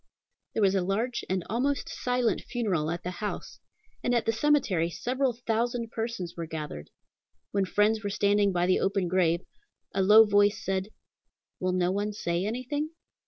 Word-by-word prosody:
There 220 - +2
was 195 -1 +4
a 195 - +2
large 215 +7 -1
and 185 -1 0
almost 265 +6 0
silent 250 -1 0
funeral 195 -11 0
at 170 +1 -3
the 180 - -3
house, 205 +3 -5 0.4
and 245 - +2
at 235 - +1
the 225 - +3
cemetery 225 - +2
several 255 +8 0
thousand 230 +1 0
persons 225 -7 -4
were 170 -1 -5
gathered. 150 - -6 0.6
When 200 -1 +1
friends 215 +3 +2
were 205 - -1
standing 205 0 +2
by 175 -1 +1
the 185 - +3
open 195 -2 +1
grave, 175 -1 +2 0.5
a 195 - +1
low 210 +3 +8
voice 205 0 +3
said, 190 +1 -1 0.7
""Will 185 0 0
no 180 0 +2
one 205 +2 -1
say 175 -1 -1
anything?" 255 +7 -2
205 Hz, 165 wpm, -28 LUFS, 185-230 Hz, 0.7 s, low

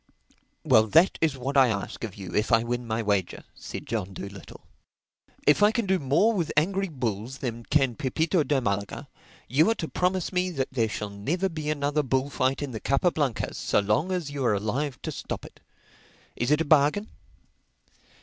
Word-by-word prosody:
"Well 110 -7 +5
that 165 - +4
is 155 -4 +1
what 135 +3 -4
I 135 -2 +6
ask 100 -1 -3
of 110 -4 -5
you—if 105 +4 -2
I 115 0 +5
win 120 0 -3
my 115 0 -1
wager," 100 -4 -1
said - - -8
John 100 -4 -3
Dolittle. 100 -1 -9 0.8
"If 150 - +4
I 210 +1 +6
can 225 0 -1
do 190 -1 +2
more 150 - +3
with 175 -7 -1
angry 195 +5 +2
bulls 120 -3 -3
than 120 -4 -5
can 135 -4 +2
Pepito 160 - 0
de 145 -2 +1
Malaga, 100 -4 -3 0.4
you 150 - +3
are 225 - +2
to 160 - -4
promise 180 +1 -1
me 180 0 +1
that 135 -7 -2
there 115 -4 0
shall 105 -1 -4
never 160 - -1
be 155 -3 -4
another 145 0 0
bullfight 135 0 0
in 140 - -4
the 110 - -5
Capa 140 +9 +2
Blancas 140 -8 -2
so - - 0
long 105 - +1
as 175 -6 -2
you 140 -2 -3
are 115 -4 +3
alive 125 +7 -2
to - - -3
stop - - -6
it. - - -14 0.8
Is 120 - -1
it 150 +2 +3
a - - 0
bargain?" 150 +8 +3
135 Hz, 190 wpm, -26 LUFS, 115-160 Hz, 0.8 s, I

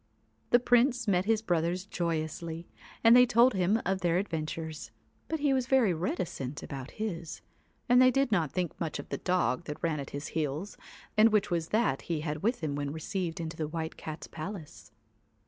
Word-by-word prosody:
The 240 - +6
Prince 245 0 +3
met 185 -2 +2
his 220 0 +2
brothers 175 0 0
joyously, 165 -1 -3 0.4
and 230 +1 +8
they 250 0 +7
told 240 +3 +5
him 190 +3 +2
their 180 -2 +1
adventures, 160 -3 -4 0.4
but 320 -2 -3
he 285 -2 +3
was 260 -2 0
very 255 -8 +4
reticent 160 -5 -3
about 135 -1 -6
his, 175 -7 -4 0.5
and 250 0 +6
they 255 - +7
did 270 -1 +1
not 165 -8 +1
think 180 -3 -3
much 165 -2 -2
of - - -8
the - - -3
dog 180 -4 0
that 150 +2 -7
ran 160 -3 0
at 140 - -6
his 145 +2 -6
heels, 155 +5 -3 0.4
and 215 +1 +7
which 210 -3 +1
was 165 -2 0
that 210 - +1
he 165 -3 -3
had 150 -1 -3
with 230 +1 0
him 150 -2 -1
when 145 0 -2
received 165 +2 -3
into 165 0 -4
the 155 - -2
White 160 0 -4
Cat's 155 0 -7
palace. 160 - -8
175 Hz, 185 wpm, -30 LUFS, 155-220 Hz, 0.5 s, and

